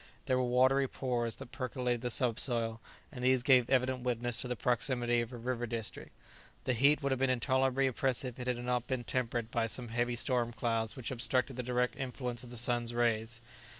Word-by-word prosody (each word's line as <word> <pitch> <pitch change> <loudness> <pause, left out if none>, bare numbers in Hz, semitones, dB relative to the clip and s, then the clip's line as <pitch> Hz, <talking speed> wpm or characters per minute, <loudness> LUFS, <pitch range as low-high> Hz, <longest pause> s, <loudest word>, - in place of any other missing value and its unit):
There 130 0 +2
were - - +2
watery 130 +2 +3
pores 120 -3 -2
that - - -10
percolated 125 -2 -2
the 125 - -2
subsoil, 115 -2 +1 0.3
and 125 -4 -7
these 130 -1 +3
gave 130 -4 +5
evident 130 0 +2
witness 120 -1 0
to - - -2
the 125 - -2
proximity 120 0 +1
of 120 +1 -5
a 125 - -7
river 120 0 -3
district. 115 -2 -5 0.5
The 130 - +1
heat 140 +5 +4
would 140 - 0
have 130 - 0
been 135 0 +2
intolerably 130 +1 +2
oppressive 130 -1 -1
if 125 - -4
it 125 - +1
had 120 +1 -7
not 125 -1 0
been 130 -2 -2
tempered 120 -2 -2
by 115 -1 +1
some 120 +1 -5
heavy 120 +1 0
storm 120 -1 0
clouds 115 -1 -1
which 130 -2 -5
obstructed 125 +2 0
the 125 - -2
direct 125 0 0
influence 125 -2 -4
of 125 - -10
the 120 - -4
sun's 120 0 +1
rays. 115 -1 0
125 Hz, 205 wpm, -32 LUFS, 120-130 Hz, 0.5 s, gave